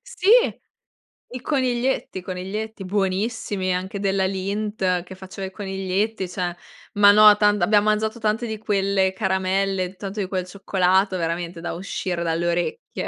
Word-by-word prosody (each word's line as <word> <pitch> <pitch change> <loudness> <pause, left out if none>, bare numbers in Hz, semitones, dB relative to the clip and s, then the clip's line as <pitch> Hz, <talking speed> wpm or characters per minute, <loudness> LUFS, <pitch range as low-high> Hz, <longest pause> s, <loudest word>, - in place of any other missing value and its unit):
Sì! 480 -6 -7 1.0
I 250 0 -7
coniglietti, 255 -7 -1
coniglietti, 195 +3 -5
buonissimi, 195 0 -1
anche 190 +2 -4
della 195 -1 +1
Lindt 195 -1 -1
che 185 - -11
faceva 190 +1 -8
i - - -10
coniglietti, 195 +1 -2
cioè, 180 -1 -3 0.4
ma 205 0 +7
no 210 0 +8
tant 205 -1 +2
abbiamo 210 0 +4
mangiato 215 +2 0
tante 225 +1 -1
di 220 - -4
quelle 195 -2 +1
caramelle, 190 0 -1
tanto 200 +1 -5
di 190 - -2
quel 185 -2 -2
cioccolato, 190 0 +1
veramente, 170 0 -3
da 175 - -4
uscire 180 -1 -3
dalle 165 +1 -1
orecchie. 175 - -2
195 Hz, 140 wpm, -23 LUFS, 185-210 Hz, 1.0 s, no